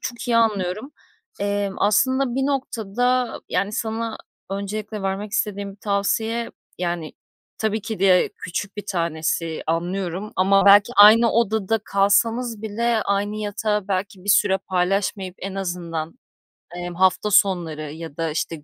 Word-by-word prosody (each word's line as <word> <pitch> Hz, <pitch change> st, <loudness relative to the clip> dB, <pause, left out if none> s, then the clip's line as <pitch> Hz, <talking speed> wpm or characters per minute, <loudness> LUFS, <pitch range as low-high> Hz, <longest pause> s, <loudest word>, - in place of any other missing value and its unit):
çok 240 Hz, 0 st, -6 dB
iyi 235 Hz, -, +3 dB
anlıyorum. 215 Hz, +2 st, 0 dB, 0.5 s
Eee, 200 Hz, 0 st, 0 dB
aslında 260 Hz, +6 st, +2 dB
bir 270 Hz, +1 st, 0 dB
noktada, 250 Hz, -2 st, -1 dB
yani 200 Hz, +1 st, -1 dB
sana 225 Hz, 0 st, -3 dB, 0.3 s
öncelikle 205 Hz, +1 st, -4 dB
vermek 195 Hz, +2 st, -3 dB
istediğim 200 Hz, -2 st, -2 dB
bir -, -, -17 dB
tavsiye, 220 Hz, +3 st, -1 dB, 0.3 s
yani, 175 Hz, -3 st, -3 dB, 0.5 s
tabii 220 Hz, 0 st, 0 dB
ki 220 Hz, +1 st, -5 dB
de 185 Hz, -2 st, +4 dB
küçük 195 Hz, +3 st, -5 dB
bir 205 Hz, -, -5 dB
tanesi, 165 Hz, -2 st, -2 dB
anlıyorum 180 Hz, +4 st, -2 dB
ama 195 Hz, +1 st, +4 dB
belki 200 Hz, 0 st, +7 dB
aynı 220 Hz, +3 st, +8 dB
odada 220 Hz, -1 st, +1 dB
kalsanız 225 Hz, +3 st, +1 dB
bile 225 Hz, +1 st, 0 dB
aynı 200 Hz, +1 st, -1 dB
yatağı 210 Hz, -1 st, -2 dB
belki 190 Hz, 0 st, -3 dB
bir -, -, -9 dB
süre 195 Hz, -1 st, +4 dB
paylaşmayıp, 190 Hz, 0 st, -1 dB
en 195 Hz, 0 st, -6 dB
azından, 170 Hz, -4 st, -4 dB, 0.6 s
emm, 175 Hz, 0 st, -5 dB
hafta 190 Hz, +3 st, +2 dB
sonları 165 Hz, -6 st, +2 dB
ya 160 Hz, -1 st, -9 dB
da 165 Hz, 0 st, -1 dB
g 155 Hz, -, -3 dB
işte 155 Hz, 0 st, -3 dB
200 Hz, 140 wpm, -22 LUFS, 185-220 Hz, 0.6 s, aynı